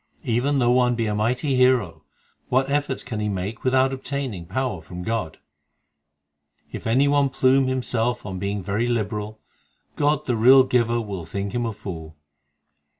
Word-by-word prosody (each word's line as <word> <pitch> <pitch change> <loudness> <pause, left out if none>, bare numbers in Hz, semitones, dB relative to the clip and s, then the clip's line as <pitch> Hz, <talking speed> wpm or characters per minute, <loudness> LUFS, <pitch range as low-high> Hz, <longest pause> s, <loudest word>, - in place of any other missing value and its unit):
Even 130 +2 +1
though 120 -2 +3
one 125 -1 +3
be 115 -1 -1
a 105 - -1
mighty 125 +7 0
hero, 125 -11 +2 0.5
What 135 +2 +1
efforts 145 -2 -1
can 110 - -5
he 105 0 -1
make 100 +3 -4
without 130 +1 +2
obtaining 130 -9 -5
power 130 -8 -2
from 90 +3 -8
God? 110 -7 -3 1.3
If - - -6
any 130 +5 +3
one 140 -1 +3
plume 130 +1 +3
himself 125 -2 -1
on 95 -2 -5
being 100 0 -3
very 105 +6 -1
liberal, 110 -2 -2 0.6
God 150 0 +1
the 125 - 0
real 130 +4 +7
Giver 120 -2 +1
will 100 -7 -6
think 100 +3 -4
him 120 -1 -1
a - - -2
fool. 80 -6 -8
120 Hz, 160 wpm, -23 LUFS, 105-130 Hz, 1.3 s, real